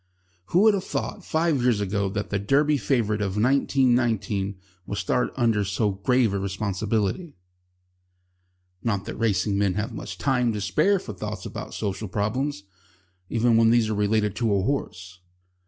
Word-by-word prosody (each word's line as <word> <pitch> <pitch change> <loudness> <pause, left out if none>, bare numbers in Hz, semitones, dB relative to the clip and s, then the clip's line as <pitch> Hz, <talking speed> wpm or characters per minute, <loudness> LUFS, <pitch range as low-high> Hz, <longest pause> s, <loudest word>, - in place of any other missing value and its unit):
Who 175 - +2
would 215 0 +6
have 195 -2 -1
thought 200 - -4
five 160 -5 +1
years 120 -4 +2
ago 100 0 -1
that 105 0 -4
the 100 - 0
Derby 145 +8 +2
favourite 110 -7 0
of 100 -2 -2
1919 120 -5 +1 0.3
would 100 - -4
start 100 +6 0
under 115 -5 +2
so 100 +2 0
grave 110 +3 +1
a 100 - 0
responsibility? 100 - -2 1.5
Not 100 -4 -1
that 115 - -5
racing 100 -2 0
men 100 -3 +1
have 105 +1 -3
much - - -7
time 125 -4 +1
to 105 - -3
spare 155 - +2
for 110 - -7
thoughts 90 - -6
about - - -7
social 105 +1 -3
problems, 105 +5 -2 0.7
even 115 0 +3
when 115 0 +5
these 115 -2 +3
are - - 0
related 105 0 +1
to 115 -3 +1
a 95 - +1
horse. 95 -8 -3
110 Hz, 160 wpm, -25 LUFS, 100-125 Hz, 1.5 s, would